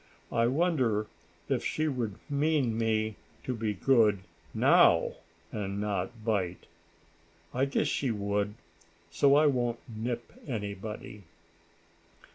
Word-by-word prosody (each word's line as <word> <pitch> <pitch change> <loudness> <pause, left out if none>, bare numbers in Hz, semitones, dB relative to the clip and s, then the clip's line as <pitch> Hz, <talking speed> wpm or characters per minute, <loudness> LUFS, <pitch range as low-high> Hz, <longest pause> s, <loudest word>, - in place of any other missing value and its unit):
"I 115 0 +3
wonder 130 -7 +1 0.4
if - - 0
she 155 0 0
would 120 -8 -2
mean 145 -5 +1
me 110 -1 0 0.3
to 125 - -2
be 110 -2 -2
good 110 -3 +4 0.3
now; - - +5 0.4
and 100 -2 -3
not 105 +2 -3
bite. 95 -5 -1 0.9
I 130 +2 +2
guess 140 - 0
she 140 -2 0
would, 105 -1 -1 0.6
so 140 +12 +4
I 150 +1 +5
won't 120 -4 +1
nip 120 +1 -4
anybody." 105 -3 -5
115 Hz, 110 wpm, -30 LUFS, 105-130 Hz, 0.9 s, now